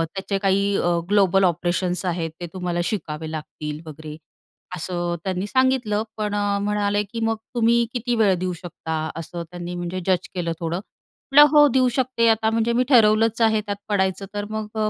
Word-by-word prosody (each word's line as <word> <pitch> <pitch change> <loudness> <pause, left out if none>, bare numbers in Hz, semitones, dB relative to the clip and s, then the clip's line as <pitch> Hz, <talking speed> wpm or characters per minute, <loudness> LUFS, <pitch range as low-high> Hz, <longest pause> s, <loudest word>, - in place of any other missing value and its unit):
त्याचे 195 +1 -2
काही 200 +1 +2
अ, 175 -1 +1
global 195 -2 +4
operations 175 +1 0
आहेत. 165 -2 -2
ते - - -3
तुम्हाला 180 -2 -2
शिकावे 160 -6 -4
लागतील," 150 -1 -6
वगैरे 155 0 -9 0.6
असं 175 0 -3
त्यांनी 190 0 -2
सांगितलं. 250 -4 +1
पण 210 -1 -2
अ, 205 -1 0
म्हणाले 205 0 0
की 210 +3 -7
"मग 225 0 +1 0.2
तुम्ही 235 0 +3
किती 245 0 -1
वेळ 215 -4 +4
देऊ 185 0 -2
शकता?" 160 -2 -6 0.2
असं 170 +1 -6
त्यांनी 175 0 -6
म्हणजे 175 +1 -4
जज 185 -2 +1
केलं 170 -2 -2
थोडं. 170 +1 -2 0.5
म्हटलं, 295 +1 +8
"हो 295 0 +8
देऊ 255 -1 +4
शकते. 255 -3 +1
आता 220 0 +2
म्हणजे 230 +1 +1
मी 250 - +3
ठरवलंच 225 -2 +4
आहे 220 -1 +3
त्यात 205 -1 -4
पडायचं 190 -1 0
तर 205 0 -3
मग 215 -1 -4
अ, 215 0 +1
200 Hz, 175 wpm, -23 LUFS, 175-220 Hz, 0.6 s, म्हटलं